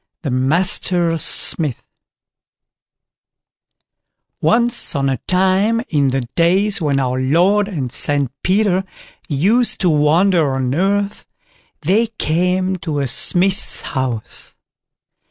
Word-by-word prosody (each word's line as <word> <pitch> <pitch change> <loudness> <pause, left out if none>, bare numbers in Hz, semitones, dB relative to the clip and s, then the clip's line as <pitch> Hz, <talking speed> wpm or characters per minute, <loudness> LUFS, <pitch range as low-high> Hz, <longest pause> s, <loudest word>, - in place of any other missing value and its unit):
THE 140 - -3
MASTER 170 +5 0
SMITH 150 -3 0 2.6
Once 235 +3 +2
on 135 -1 0
a 135 - -1
time, 190 +5 +1
in 145 -4 +1
the 135 0 -1
days 190 +4 +1
when 145 -3 0
our 130 -1 -1
Lord 180 +10 +2
and 145 - -5
St 140 -3 0
Peter 190 -1 +1 0.5
used 210 - +2
to 180 -4 +2
wander 155 0 +2
on 130 -1 -2
earth, 200 +5 -1 0.5
they 200 +9 +1
came 180 +3 0
to 160 -4 -5
a 140 -1 -1
smith's 185 +9 +2
house. 130 -5 -5
170 Hz, 105 wpm, -17 LUFS, 140-195 Hz, 2.6 s, Once